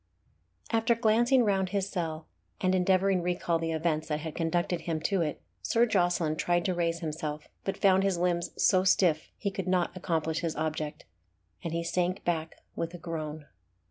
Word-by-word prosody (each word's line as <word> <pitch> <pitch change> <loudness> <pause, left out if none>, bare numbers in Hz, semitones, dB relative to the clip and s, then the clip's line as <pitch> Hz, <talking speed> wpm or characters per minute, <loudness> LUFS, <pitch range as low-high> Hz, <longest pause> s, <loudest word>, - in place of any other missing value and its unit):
After 225 +1 +3
glancing 240 +3 +4
round 190 -2 +1
his 195 -1 -1
cell, 165 -4 -3 0.3
and 185 0 +2
endeavouring 185 0 +3
recal 175 -1 0
the 165 0 -2
events 160 -1 0
that 150 -1 -2
had 160 0 -5
conducted 175 +1 0
him 165 -2 -2
to 195 +2 +1
it, 150 -3 -2 0.2
Sir 230 - +3
Jocelyn 175 -7 +1
tried 175 +1 +1
to 185 - +1
raise 170 -1 -1
himself, 155 -2 -4 0.2
but 195 - -2
found 190 -1 +4
his 195 -2 +1
limbs 175 -1 0
so 185 -2 +4
stiff 175 -4 +3
that - - -29
he 200 - -2
could 190 -1 -4
not 180 -1 +1
accomplish 160 -3 -1
his 165 -2 -2
object, 155 -1 -3 0.6
and 165 - -3
he 170 +1 -1
sank 180 +2 -1
back 165 -2 -2
with 165 +1 -3
a - - -6
groan. 155 -3 -5
175 Hz, 180 wpm, -29 LUFS, 160-190 Hz, 0.6 s, glancing